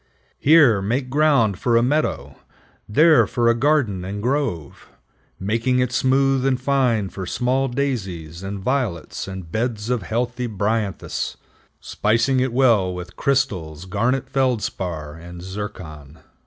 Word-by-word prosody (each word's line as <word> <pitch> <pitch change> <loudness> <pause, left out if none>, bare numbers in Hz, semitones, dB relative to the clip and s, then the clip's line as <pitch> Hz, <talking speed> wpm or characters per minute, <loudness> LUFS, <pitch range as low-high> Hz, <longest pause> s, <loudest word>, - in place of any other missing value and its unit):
Here 140 -9 +5
make 125 +6 -2
ground 140 -9 +3
for 120 -2 +2
a 115 - +3
meadow; 150 +5 -1 0.5
there, 155 +8 +5
for 120 -2 +1
a - - +5
garden 120 -7 +1
and 100 +3 -5
grove, 120 - -3 0.5
making 115 +6 0
it 125 -1 +1
smooth 135 +1 +2
and 130 -1 +1
fine 125 -7 +1
for 95 -1 -7
small 130 +6 0
daisies 95 - -3
and 100 +1 -5
violets 105 - -2
and 95 -4 -8
beds 115 +1 -2
of 125 -3 0
heathy 125 +2 -2
bryanthus, 105 -1 -2 0.4
spicing 115 +5 +1
it 130 0 0
well 115 -7 +3
with 90 0 -8
crystals, 95 - -1
garnet 115 +8 0
feldspar, 95 - -2
and 85 +1 -10
zircon." 85 -7 -8
115 Hz, 130 wpm, -21 LUFS, 95-130 Hz, 0.5 s, Here